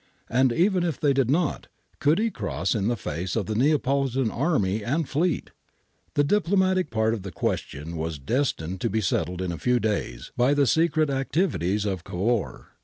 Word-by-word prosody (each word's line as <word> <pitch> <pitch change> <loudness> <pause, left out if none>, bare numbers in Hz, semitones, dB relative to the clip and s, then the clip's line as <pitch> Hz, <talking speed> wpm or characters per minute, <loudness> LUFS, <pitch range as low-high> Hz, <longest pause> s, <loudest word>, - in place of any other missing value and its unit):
And 130 +1 +3
even 180 - +2
if 165 -6 -2
they 145 -2 +3
did 135 -3 +1
not, 155 +1 0 0.3
could 150 +3 +3
he 225 +1 +1
cross 95 - -2
in 105 -2 0
the 120 0 0
face 90 0 -4
of 110 -4 0
the 110 - -3
Neapolitan 135 -1 +1
army 110 - 0
and 150 +7 -1
fleet? 165 +2 -1 0.6
The 145 - +4
diplomatic 185 0 +2
part 110 0 +1
of 110 - -3
the 95 0 -7
question 75 +1 -3
was 80 -1 -3
destined 95 - -2
to - - 0
be 110 - 0
settled 90 -1 -1
in 90 - -2
a 85 - -5
few 125 0 +2
days 100 - -2
by 125 +4 +3
the 145 -1 +4
secret 155 +1 +2
activities 135 - 0
of 95 -4 -2
Cavour. 105 +6 -2
120 Hz, 180 wpm, -25 LUFS, 95-145 Hz, 0.6 s, The